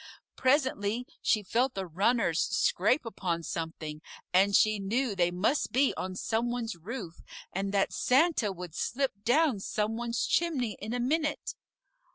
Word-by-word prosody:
Presently 255 -4 +1 0.2
she 215 - +2
felt 245 +6 0
the 195 - -3
runners 180 0 +1
scrape 245 +9 +2
upon 180 -6 -3
something, 160 -2 -5 0.3
and 195 +2 +4
she 215 0 +4
knew 225 +4 0
they 175 -2 +2
must 185 +11 0
be 270 +2 +3
on 185 0 -4
some 225 +5 -1
one's 240 -4 -3
roof, 180 -1 -7 0.3
and 195 +1 -2
that 200 -1 +1
Santa 260 - +2
would 180 -3 -8
slip 270 +9 -1
down 265 -1 +3
some 215 +3 -2
one's 235 0 -1
chimney 280 -10 0
in 215 +2 -5
a - - -1
minute. 300 +4 -1
220 Hz, 150 wpm, -29 LUFS, 190-255 Hz, 0.3 s, and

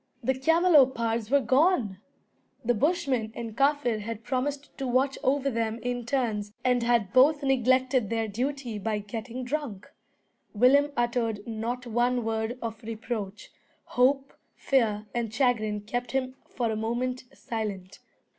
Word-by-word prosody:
The 265 - +2
camelopards 265 -7 +3
were 280 +1 +4
gone! 255 - +2 0.7
The 245 - +3
Bushman 270 - 0
and 230 -2 -6
Kaffir 275 -4 +2
had 225 +1 -6
promised 280 +3 -3
to 270 - -2
watch 260 +2 +2
over 275 +1 +1
them 225 -1 -1
in 245 -1 -3
turns, 225 -6 -1
and 250 -1 +3
had 235 -5 +1
both 285 +3 +5
neglected 255 -3 +2
their 225 -1 -1
duty 245 +1 -3
by 215 +1 -1
getting 225 +4 -6
drunk. 250 -7 -4 0.7
Willem 280 +6 +5
uttered 235 -3 0
not 235 +3 -3
one 240 +1 +1
word 225 +2 -2
of 225 0 -5
reproach. 220 -3 -5 0.4
Hope, 270 +2 +2 0.2
fear, 220 -6 +1
and 235 -2 -2
chagrin 220 -4 +1
kept 245 +3 -4
him 255 -1 -1 0.2
for 235 -3 -1
a - - -1
moment 245 +4 -2
silent. 200 -4 -5
240 Hz, 135 wpm, -27 LUFS, 220-265 Hz, 0.7 s, both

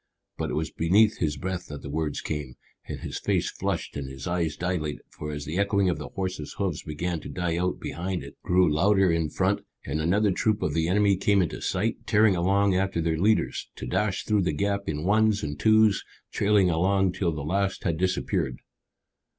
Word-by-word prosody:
But - - -3
it - - -2
was 80 0 -2
beneath 100 +8 +3
his 75 -3 0
breath 90 +4 -4
that 75 -1 -8
the - - -6
words 75 -1 -2
came, 75 -5 -4 0.3
and - - -6
his - - -5
face - - 0
flushed - - -3
and 70 -2 -4
his 65 0 -8
eyes 85 -4 -1
dilated, 85 -4 -2
for 75 0 -6
as 75 -1 -5
the 80 +5 -2
echoing 100 -2 +2
of 75 - -4
the 75 - -6
horses' 95 -6 -4
hoofs 95 -6 -1
began 85 +3 -3
to - - -9
die 90 -2 -2
out 90 +1 -1
behind 90 +2 -4
it - - -11
grew 90 0 +3
louder 95 +3 +4
in 80 -2 0
front, - - 0 0.2
and 80 - -2
another 100 +6 +2
troop 105 +3 0
of - - 0
the 80 0 +1
enemy 100 +1 +3
came 100 0 +3
into 85 - -4
sight, 110 +5 0
tearing 110 -3 +4
along 100 +3 +2
after 95 -1 0
their 80 -1 0
leaders, 110 +4 +1
to - - -7
dash 100 +10 -1
through 105 -2 +2
the 85 -4 0
gap 100 +4 -1
in 75 0 -2
ones 110 +1 +3
and 75 -1 -4
twos, 110 -2 +4 0.3
trailing 100 -3 +3
along 95 +3 +2
till 90 -1 -1
the 75 -2 -5
last 95 +4 -1
had 85 -3 -1
disappeared. 90 -7 0
90 Hz, 205 wpm, -26 LUFS, 80-100 Hz, 0.3 s, louder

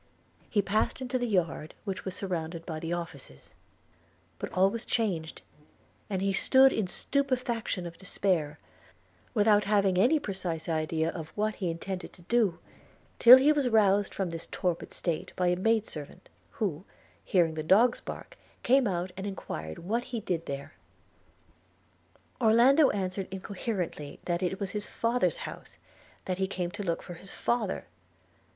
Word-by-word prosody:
He 205 -2 +2
passed 210 +6 0
into 255 0 -2
the 245 - -1
yard, 175 -6 -1
which 195 -1 -4
was 190 -1 -4
surrounded 170 -3 -4
by 160 -2 -4
the 165 +1 -4
offices; 165 - -6 0.9
but - - -5
all 190 +1 +3
was 230 +1 -4
changed; 180 -9 -2 0.7
and 190 -2 -1
he 195 0 +1
stood 265 +7 +6
in 215 - 0
the 180 - -5
stupefaction 250 -8 -1
of 170 -1 -8
despair, 180 -5 -1 0.8
without 210 -1 +4
having 200 -3 +3
any 250 +11 +5
precise 185 - -4
idea 160 0 0
of 160 -3 -7
what 215 +1 0
he 185 -4 -1
intended 180 +3 -5
to 175 - -17
do, 210 -3 +2 0.6
till 245 +2 +11
he 275 +3 +5
was 285 -4 +2
roused 205 -3 +3
from 190 -3 -2
this 165 0 -6
torpid 175 -2 -2
state 170 -3 -3
by 180 -1 +2
a 180 - +2
maid 220 +3 +2
servant, 150 +2 -9 0.2
who, 185 -6 -3 0.4
hearing 170 -4 +2
the 155 - -3
dogs 215 +10 +4
bark, - - -9 0.2
came 260 -1 +4
out 180 -1 -2
and 195 +1 -5
enquired 80 - -6
what 225 +8 -2
he 240 -2 -4
did 175 -5 -3
there. 140 0 -5 1.7
Orlando 245 +6 +6
answered 190 -1 -2
incoherently 190 -5 -4
that 175 0 -1
it 185 +1 -1
was 200 -2 -3
his 210 -1 -3
father's 240 - +1
house - - -9 0.2
– - - -28
that 185 0 -2
he 190 - +1
came 180 -2 -3
to 205 +2 -6
look 170 -4 -2
for 175 - -8
his 185 +3 -12
father. 230 -3 -1
190 Hz, 160 wpm, -29 LUFS, 170-220 Hz, 1.7 s, till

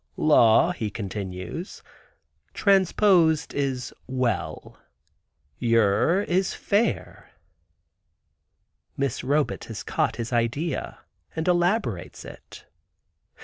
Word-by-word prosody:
"Law," 150 +1 +5
he 115 -11 -3
continues, 100 - -6 0.7
"transposed 190 -4 +3
is 135 -3 -2
'well;' 125 -9 -3 0.8
yer 115 - +2
is 185 +1 0
'fare.'" 210 +4 -1 1.7
Miss 140 -1 -1
Robet 145 +3 0
has - - -7
caught - - -1
his 120 +1 -5
idea, 125 +7 -2 0.3
and 160 +1 -3
elaborates 175 - 0
it. - - -13
140 Hz, 80 wpm, -25 LUFS, 115-175 Hz, 1.7 s, Law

